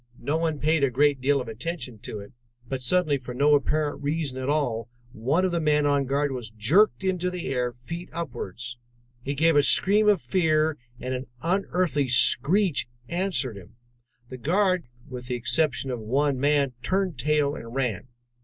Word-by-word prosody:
No 145 - -2
one 160 -2 0
paid 155 +1 +1
a 140 - +4
great 140 +2 +2
deal 140 +2 +2
of 125 - -5
attention 125 0 -5
to 105 - -7
it, 100 - -12 0.4
but 130 +1 -4
suddenly 150 +2 +2
for 125 -1 -8
no 145 +3 +4
apparent 145 0 +1
reason 145 -2 -2
at 130 +1 -3
all 120 -7 -1 0.2
one 140 +13 0
of 185 - 0
the 170 - 0
men 150 -1 +2
on 145 -1 +2
guard 140 +1 0
was 125 -4 -5
jerked 145 - +2
into 180 -1 0
the 180 -4 -4
air 125 -2 0
feet 165 +9 -8
upwards. 120 - -6 0.4
He 140 +3 -3
gave 165 +2 +3
a 145 - +6
scream 210 +8 +4
of 205 -4 +4
fear, 155 +1 +1 0.2
and 130 +1 -4
an 130 +1 -4 0.2
unearthly 175 -5 0
screech 135 - +3 0.2
answered 170 - -1
him. 95 +4 -14 0.5
The 130 - -7
guard, 185 - +1 0.2
with 125 -2 -8
the 125 - -2
exception 135 +1 0
of 125 - -3
one 135 +5 0
man, 140 -1 +2
turned 185 -3 -1
tail 145 +1 +1
and 115 -3 -8
ran. 125 -4 -2
145 Hz, 180 wpm, -25 LUFS, 125-165 Hz, 0.5 s, a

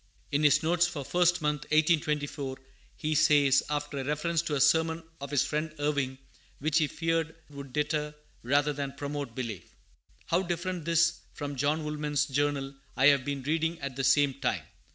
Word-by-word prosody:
In 145 - +1
his 150 0 +4
notes 175 +2 +3
for 145 -5 -5
First 175 0 +2
Month, 150 -2 -1
1824, 150 -3 +1 0.4
he 155 -1 -2
says, 145 -3 +5
after 145 -1 -2
a - - -2
reference 150 +4 0
to 160 -3 -2
a - - 0
sermon 160 +3 +3 0.2
of 140 0 -6
his 145 -2 +2
friend 155 +1 -2
Irving, 145 -3 -1 0.4
which 155 +2 +1
he 155 - +2
feared 165 +1 -1 0.2
would 140 -2 -9
deter 150 +1 -1 0.3
rather 145 +4 +2
than 140 -1 -4
promote 140 -3 -5
belief: 110 -9 -6 0.5
"How 170 +2 +2
different 175 -1 -3
this 165 0 +3 0.2
from 145 -1 -5
John 145 +4 0
Woolman's 150 -1 -1
Journal 140 0 -1 0.2
I 135 +2 +7
have 140 -2 +3
been 140 -1 -3
reading 160 +3 0
at 140 -2 -5
the 135 - -2
same 145 0 +4
time! 130 -1 -2
150 Hz, 175 wpm, -29 LUFS, 140-160 Hz, 0.5 s, I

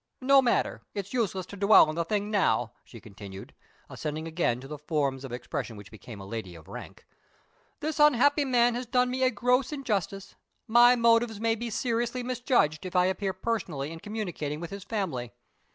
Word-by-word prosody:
No 275 +1 +5
matter; 245 -2 0
it's 200 +1 -5
useless 195 -7 -1
to 200 - -10
dwell 200 +2 +7
on 155 - -3
the 170 +1 -1
thing 205 +3 -2
now," 120 - +1
she 115 - -13
continued, 100 -2 -11 0.3
ascending 155 +1 -5
again 160 -7 0
to 135 - -10
the 150 0 -7
forms 140 -3 -1
of 135 - -7
expression 120 -1 -5
which 100 +1 -12
became 110 0 -11
a 95 - -9
lady 100 -4 -6
of 80 - -14
rank. - - -10 0.8
"This 310 0 -3
unhappy 290 0 +5
man 245 -3 +3
has 245 +1 -4
done 250 +1 +2
me 260 +1 -2
a 255 - +4
gross 250 +4 +1
injustice; 200 - -3 0.3
my 240 +2 +7
motives 230 -2 +3
may 225 +1 +1
be 230 +1 -4
seriously 235 +2 -1
misjudged, 245 - +1
if 185 0 -7
I 180 0 +5
appear 190 +1 -1
personally 185 -8 -3
in 165 - -8
communicating 175 -8 -4
with 170 +1 -7
his 200 -1 -7
family. 160 - -3
200 Hz, 185 wpm, -28 LUFS, 150-240 Hz, 0.8 s, dwell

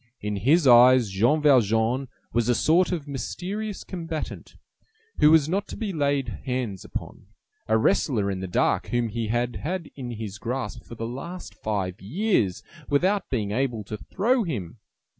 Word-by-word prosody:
In 105 0 -3
his 145 - +3
eyes, 125 -3 +7
Jean 120 +11 +2
Valjean 120 -1 +3 0.3
was 120 0 +1
a 120 - +4
sort 170 +9 +3
of 160 -5 -3
mysterious 190 - -4
combatant, 165 -4 -6 0.6
who 150 - +7
was 155 -2 +5
not 195 +5 -1
to - - -8
be 215 -4 -3
laid 140 -3 0 0.2
hands 125 -7 -3
upon, - - -7 0.4
a 110 - +3
wrestler 110 -2 +2
in 95 - -3
the 95 - -4
dark 90 - +1
whom 120 -1 0
he 115 +1 -3
had 120 +2 -1
had 170 +1 -4
in 130 -3 -6
his 105 -3 -6
grasp 125 +4 -4
for 120 - -10
the 115 - -4
last 170 +10 -7
five 95 -4 -3
years, 115 - 0 0.3
without 185 +8 +1
being 110 -6 -1
able 120 -2 -1
to 105 +2 -6
throw 235 - +1
him. 110 - -5
125 Hz, 165 wpm, -25 LUFS, 110-160 Hz, 0.6 s, eyes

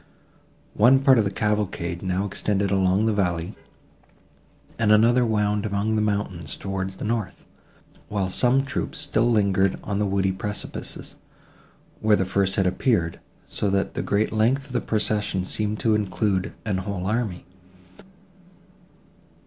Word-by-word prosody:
One 125 +5 +5
part 135 -3 +5
of 110 - +2
the - - +1
cavalcade 100 -5 -2
now 95 +1 -1
extended 100 0 -1
along 95 +2 +2
the 110 - +2
valley, 90 -4 -1 1.3
and 110 -2 +3
another 115 +4 +5
wound 105 -2 +1
among 105 +1 -1
the 110 - +1
mountains 100 -8 -2
towards 95 -1 -4
the - - -5
north, 110 -4 -3 0.6
while 100 -3 -1
some 125 +8 +2
troops 140 - -4
still 120 -6 +1
lingered 100 -4 +2
on 100 -1 -2
the 105 - +1
woody 95 0 +1
precipices, 105 +2 -5 0.8
where 110 -1 +4
the 95 - 0
first 95 +1 0
had 95 - +2
appeared, 90 -3 0 0.3
so 105 - -2
that 95 0 0
the - - -2
great 105 +2 0
length 120 +6 +2
of 135 - -13
the 125 - 0
procession 105 -3 0
seemed 105 +2 -2
to 110 - +2
include 100 -2 0
a 105 - -1
whole 95 -2 -4
army. 105 -3 -2
105 Hz, 145 wpm, -24 LUFS, 95-110 Hz, 1.3 s, One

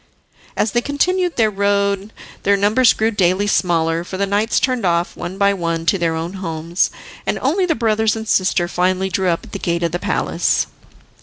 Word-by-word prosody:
As 210 - +1
they 240 - +1
continued 355 +6 0
their 220 -2 +2
road 200 0 0 0.3
their 200 0 +3
numbers 215 +5 +4
grew 220 +1 0
daily 190 -1 +1
smaller, 170 -4 +1
for 185 +1 -7
the 200 - +1
knights 205 +3 +1
turned 255 -3 0
off 170 -1 0
one 175 +2 -6
by 200 0 +3
one 165 -3 -2
to 195 +3 +2
their 165 -1 0
own 165 +3 -4
homes, 165 0 -1 0.4
and - - 0
only 355 +8 +1
the 325 - +1
brothers 220 -1 +1
and 220 0 -6
sister 185 -3 +2
finally 185 +2 0
drew 190 0 0
up 170 - -1
at - - -13
the - - -5
gate 170 0 -1
of 170 - 0
the 175 - -2
palace. - - 0
195 Hz, 200 wpm, -19 LUFS, 175-220 Hz, 0.4 s, numbers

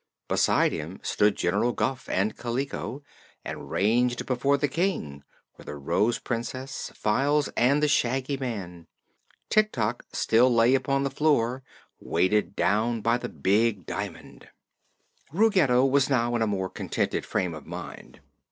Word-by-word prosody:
Beside - - +2
him 80 +5 -6
stood 105 0 +2
General 120 0 0
Guph 130 -1 -2
and 100 +3 0
Kaliko, 130 +3 -4 0.4
and - - -7
ranged 120 +4 +1
before 135 +2 +1
the 145 - +1
King 130 - -2 0.3
were - - -14
the 75 - -7
Rose 105 +11 0
Princess, 130 +3 -5
Files 140 +7 +1
and 140 +5 +2
the - - +4
Shaggy 135 0 +1
Man. 95 -10 -6 0.6
Tik 215 0 +4
Tok 115 +3 -2
still 120 +3 +3
lay 120 +1 +4
upon 135 +1 +1
the 140 - -1
floor, 135 -4 +1 0.4
weighted 95 +2 0
down 110 +2 +1
by 115 +3 +1
the - - -5
big 100 +5 +1
diamond. - - -7 0.8
Ruggedo 165 - +3
was 135 0 +2
now 120 -3 +1
in 120 - 0
a 110 - +2
more 95 -2 -2
contented - - -2
frame 90 -2 -2
of 80 - -10
mind. - - -9
120 Hz, 145 wpm, -26 LUFS, 105-135 Hz, 0.8 s, the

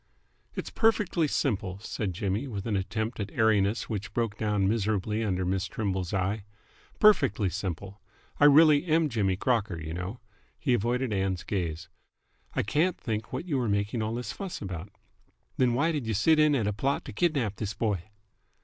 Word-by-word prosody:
"It's - - -5
perfectly 210 -8 +2
simple," 105 -10 -1
said 100 -1 -4
Jimmy, 100 +8 -2
with 100 -6 -5
an 110 -3 0
attempt 110 +4 -2
at 100 -1 -3
airiness 110 -2 +2
which 100 -2 -5
broke 115 -3 0
down 105 -3 +1
miserably 105 0 0
under 95 -3 0
Miss 95 +1 0
Trimble's 95 -2 -2
eye. 100 +2 -1 0.5
"Perfectly 110 - +4
simple. 95 +1 -5 0.4
I 145 - +6
really 145 0 +7
am 160 -2 +2
Jimmy 100 -6 +1
Crocker, 110 -4 0
you 80 0 -5
know." 90 +7 -5 0.4
He 135 -5 +1
avoided 120 +1 0
Ann's 95 -2 -1
gaze. 85 -5 -3 0.7
"I - - +1
can't 160 - +1
think 110 -1 -4
what 130 +7 -4
you 145 -7 0
are 120 -3 0
making 100 +3 0
all 110 +1 -2
this 120 +1 -4
fuss 195 -3 -6
about." 95 -2 -6 0.7
"Th'n 125 -2 +3
why 155 +6 +2
did 145 -7 -3
y' 110 - 0
sit 155 +11 +4
in 150 -1 +5
at 115 -6 +1
a 105 - 0
plot 135 +7 -1
to - - -7
kidnap 125 - 0
this 105 -2 -4
boy?" 100 -7 -1
110 Hz, 175 wpm, -28 LUFS, 95-130 Hz, 0.7 s, really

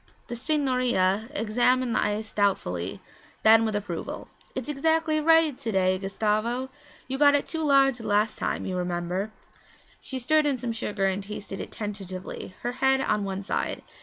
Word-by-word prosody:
The 240 - -3
signorina 250 - +1
examined 245 +1 +2
the - - +2
ice 210 +1 -2
doubtfully, 95 - -1 0.4
then 225 +1 +7
with 215 -1 -1
approval. 200 -5 -5 0.3
'It's 260 -2 -4
exactly 315 +2 +1
right 325 -2 +4
to 230 - -4
day, 185 -1 +2
Gustavo! 215 +6 -1 0.4
You 265 +1 -3
got 285 -1 +6
it 285 - +1
too 320 - -4
large 275 -4 +4
the 225 - -6
last 210 +1 +1
time, - - -2
you 185 - -3
remember.' 180 +3 -2 0.7
She 265 - -6
stirred 300 +4 +2
in 280 -2 +1
some 245 -1 -3
sugar 210 -3 -2
and 190 +1 0
tasted 200 -1 -7
it - - -5
tentatively, 190 -3 -6
her 240 - -1
head 265 +1 +2
on 210 -5 0
one 195 0 -4
side. - - -2
225 Hz, 165 wpm, -26 LUFS, 195-265 Hz, 0.7 s, then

